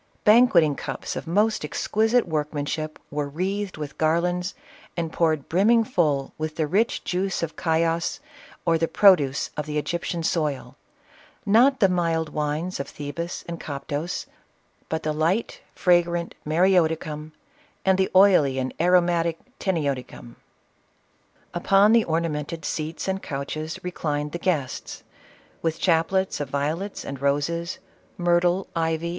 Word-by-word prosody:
Banquet 215 -5 +6
ing 150 -2 +1
cups - - -5
of - - -6
most 210 +4 +2
exquisite 220 - +1
workmanship, 155 0 -3
were 145 0 -2
wreathed 190 +5 -3
with 150 -2 -7
garlands 175 +3 +1 0.4
and 165 -1 -2
poured 155 -4 +1
brimming 220 +7 +4
full 155 - 0
with 155 0 -3
the 160 - 0
rich 200 +10 +1
juice 185 0 -1
of 160 - -3
Chios, 165 0 0 0.5
or 165 -1 +3
the 165 - +1
produce 155 -11 +4
of 150 0 -4
the 150 0 -2
Egyptian 170 +2 -2
soil 145 -6 -1 0.4
— 315 -5 -28
not 270 +1 +4
the 195 - +7
mild 165 -3 0
wines 150 +4 -2
of 140 - -3
Thebais 160 +4 -5
and 170 -1 -5
Coptos, 145 +3 -4 0.6
but 160 - -2
the 155 - -1
light 165 +9 0
fragrant 175 -1 +2
Mareoticum, 160 -3 +1 0.5
and 190 0 +3
the 190 - +2
oily 180 -9 +5
and 130 0 -2
aromatic 170 -2 +3 0.2
Tsenioticum. 140 -9 -3 1.2
Upon 195 +4 +4
the 230 -1 +5
ornamented 160 -1 -2
seats 160 +3 -3
and 190 0 -1
couches 155 +3 -5
reclined 150 -4 -2
the 170 - -4
guests, 155 -7 -2 0.6
with 165 0 -1
chaplets 185 +3 +1
of 145 - -3
violets 155 +8 -3
and 135 -1 -6
roses, 145 +5 0 0.4
myrtle, 175 +1 +2
ivy, 165 -1 0
CLEOPATRA. 170 +1 -4
165 Hz, 135 wpm, -24 LUFS, 150-180 Hz, 1.2 s, the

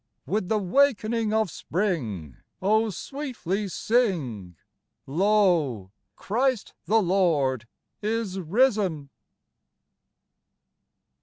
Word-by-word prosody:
With 195 -2 -1
the 220 - +2
wakening 225 0 +2
of 220 -5 +1
spring, 125 - -3 0.2
Oh, 215 +3 +2
sweetly 215 - -4
sing, 160 - -1 0.5
Lo, 165 - +2 0.2
Christ 245 +2 -1
the 225 +1 +4
Lord 150 - +1 0.3
is 215 -3 -2
risen 190 - +1
195 Hz, 75 wpm, -26 LUFS, 155-220 Hz, 0.5 s, the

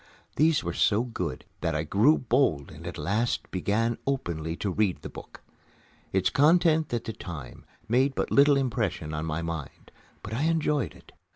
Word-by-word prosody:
These 155 0 +3
were 85 -1 -3
so 105 +5 +3
good 90 -10 -4
that 80 -1 -1
I 75 - 0
grew 110 - +4
bold 120 - +1
and - - -10
at - - -6
last 110 +5 -1
began 110 +5 0
openly 85 - -2
to 100 +2 -2
read 100 -1 0
the - - -5
book. - - -11 0.7
Its 95 -1 +1
contents 160 +1 +4
at 115 - -2
the 110 - -5
time 75 -12 -9 0.2
made 130 +4 +2
but - - -2
little 140 0 +6
impression 110 - -1
on 75 +1 -3
my 80 +1 -2
mind, 80 -4 -6 0.3
but 105 - -6
I 135 +7 0
enjoyed 150 -4 0
it. - - -18
110 Hz, 175 wpm, -27 LUFS, 85-140 Hz, 0.7 s, little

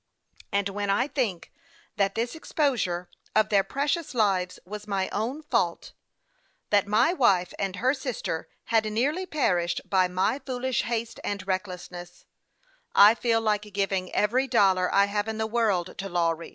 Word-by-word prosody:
And 200 0 +1
when 200 0 -3
I 240 +7 +2
think 230 - -2 0.5
that 200 -1 +1
this 230 +2 -1
exposure 245 - -1 0.3
of 215 0 +4
their 200 -2 +4
precious 285 - -2
lives 190 -5 +1
was 210 +2 -8
my 195 -2 -1
own 245 +9 -3
fault; 300 - -1 0.8
that 205 -1 +3
my 225 +11 +3
wife 190 - +2
and 195 -1 -2
her 255 +8 +2
sister 255 - -4 0.2
had 225 -1 +5
nearly 295 +12 0
perished 175 - 0
by 185 -2 +3
my 190 +8 0
foolish 260 -1 -1
haste 230 -1 -3
and 200 -2 -3
recklessness, 180 -2 -5 0.7
I 205 +2 +9
feel 230 -1 +1
like 210 -2 +1
giving 195 -2 -1
every 250 +6 +1
dollar 190 -7 +3
I 200 0 +5
have 205 +1 -2
in 220 0 -3
the 220 - 0
world 215 -6 0
to 195 0 -4
Lawry. 170 -2 0
205 Hz, 155 wpm, -26 LUFS, 190-240 Hz, 0.8 s, I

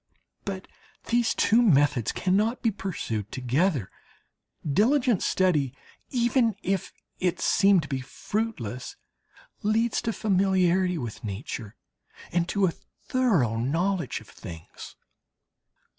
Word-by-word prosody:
But 195 -1 -5 0.4
these 235 -1 +2
two 230 +3 +4
methods 145 - +3
cannot 210 +7 +1
be 225 - +3
pursued 145 - -4
together. 130 - 0 0.8
Diligent 235 - +3
study, 150 -9 +1 0.3
even 240 -3 +2
if 195 -1 -1 0.3
it 180 -2 0
seem 200 -1 +4
to 145 - -7
be 135 -2 -2
fruitless, 130 - -4 0.7
leads 220 +2 +1
to 225 - -1
familiarity 185 -3 +2
with 120 -7 -6
nature 105 +1 -5 0.6
and 175 0 0
to 200 -2 +2
a 175 - +2 0.4
thorough 185 - +2
knowledge 165 - 0
of - - -16
things. 80 -1 -10
185 Hz, 110 wpm, -27 LUFS, 135-215 Hz, 0.8 s, two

